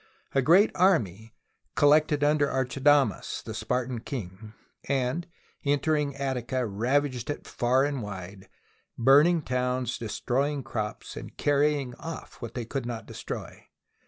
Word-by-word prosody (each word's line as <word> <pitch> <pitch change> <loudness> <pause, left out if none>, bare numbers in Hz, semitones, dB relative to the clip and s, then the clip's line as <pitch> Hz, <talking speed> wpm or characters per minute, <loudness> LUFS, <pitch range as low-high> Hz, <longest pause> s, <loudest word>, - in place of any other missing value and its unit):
A 135 - +3
great 180 - +5
army 115 - +1 0.4
collected 150 0 +4
under 145 -1 +3
Archidamus, 135 +2 +1
the - - -6
Spartan 125 -1 -2
king, 110 -4 -7 0.4
and 135 +6 0 0.4
entering 145 0 +1
Attica, 130 -2 -2
ravaged 125 +5 0
it 145 - -4
far 125 +2 +2
and 140 -3 -2
wide, 95 -2 -8 0.5
burning 145 +7 +5
towns, - - -23
THE 125 0 0
BOOK 125 - 0
OF 125 - 0
FAMOUS 125 -2 -2
SIEGES - - -5 0.2
destroying 140 +2 0
crops, 105 -3 -5
and - - -9
carrying 145 -2 +1
off 165 0 -8
what 115 - -7
they 120 -2 -3
could 130 +1 -4
not 115 -3 -5
destroy. - - -7
130 Hz, 145 wpm, -27 LUFS, 120-145 Hz, 0.5 s, great